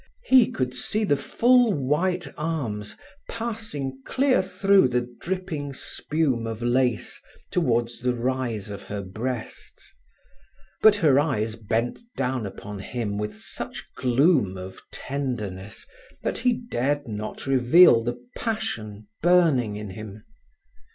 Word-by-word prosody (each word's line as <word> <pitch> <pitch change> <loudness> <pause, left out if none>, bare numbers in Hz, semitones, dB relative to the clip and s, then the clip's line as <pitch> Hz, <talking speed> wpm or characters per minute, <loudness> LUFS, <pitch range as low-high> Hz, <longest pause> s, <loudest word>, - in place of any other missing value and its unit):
He 260 - +6
could 125 -1 -2
see 210 - 0
the 170 -9 +3
full 240 - +4
white 175 +6 0
arms 130 -11 -3 0.3
passing 215 - -4
clear 265 -4 +2
through 195 -1 +4
the 125 -1 -1
dripping 165 -6 -4
spume 135 -6 -1
of 115 +1 -5
lace, 125 -1 0 0.3
towards 120 -8 +1
the 125 0 +1
rise 120 -4 -2
of 100 -1 -6
her 100 +1 -5
breasts. 115 +6 -6 0.9
But 215 -1 +7
her 150 -9 +4
eyes 115 -7 0
bent 115 +2 -1 0.2
down 125 -4 -1
upon 100 +1 -8
him 105 0 -3
with 105 0 -3
such - - -7
gloom 125 - +3
of 95 +1 -8
tenderness 110 -8 -4 0.4
that - - -1
he 245 +1 +3
dared 145 - -2
not 105 -1 -5
reveal 130 0 +6
the 120 +1 -2 0.2
passion 110 - -4
burning 160 -11 +4
in 105 -2 -6
him. 105 +1 -9
130 Hz, 125 wpm, -25 LUFS, 110-170 Hz, 0.9 s, But